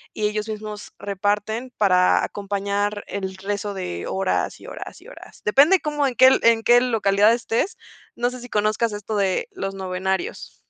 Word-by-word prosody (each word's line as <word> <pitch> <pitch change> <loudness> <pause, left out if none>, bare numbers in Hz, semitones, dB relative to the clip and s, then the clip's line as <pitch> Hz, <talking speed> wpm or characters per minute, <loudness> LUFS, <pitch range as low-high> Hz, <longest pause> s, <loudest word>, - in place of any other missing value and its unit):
y 215 - -1
ellos 210 +1 -3
mismos 210 -1 -7
reparten 210 +5 -2
para 180 -3 +4
acompañar 205 +1 -2
el 190 -1 -5
rezo 205 +1 -4
de 85 - -5
horas 190 0 -1
y - - -12
horas - - -8
y - - -16
horas. - - -14
Depende 290 - +5
como 295 -2 0
en 250 - -3
qué 260 0 +6
en 230 -1 +4
qué 240 +1 +6
localidad 215 -3 +3
estés. 235 - -1 0.4
No 245 +1 0
sé 255 - -8
si 245 - -10
conozcas 215 +1 0
esto 210 +1 -5
de 195 - 0
los 285 - -5
novenarios. 190 0 -3
210 Hz, 170 wpm, -22 LUFS, 195-235 Hz, 0.4 s, qué